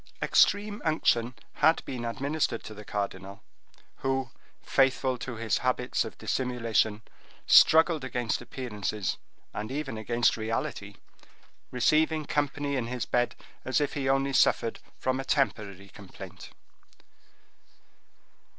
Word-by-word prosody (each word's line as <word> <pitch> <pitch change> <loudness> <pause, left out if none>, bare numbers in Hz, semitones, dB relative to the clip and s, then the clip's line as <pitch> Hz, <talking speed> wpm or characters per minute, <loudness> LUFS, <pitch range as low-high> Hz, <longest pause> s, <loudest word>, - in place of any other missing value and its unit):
Extreme 205 +1 +3
unction 125 -6 +1 0.2
had 160 +1 +3
been 125 -3 -5
administered 135 +1 -1
to 110 - -8
the 105 0 -10
cardinal, 100 0 -5 0.5
who, 135 -2 -1 0.3
faithful 135 -1 +2
to 120 0 -5
his 115 -1 0
habits 125 -1 0
of - - -9
dissimulation, 115 -4 0 0.4
struggled 160 -2 +6
against 125 -3 -2
appearances, 105 -5 -3 0.4
and 105 +3 -5
even 135 -5 -4
against 120 +2 +2
reality, 110 -2 -3 0.7
receiving 155 +5 +2
company 145 0 -1
in 120 -2 -2
his 125 -1 -3
bed, 120 0 0 0.3
as 130 +4 +1
if 145 - -1
he 135 -2 -1
only 135 0 +1
suffered 115 -2 +2 0.2
from 130 0 -1
a - - -2
temporary 100 -9 -1
complaint. 100 -1 -11
125 Hz, 115 wpm, -28 LUFS, 110-140 Hz, 0.7 s, struggled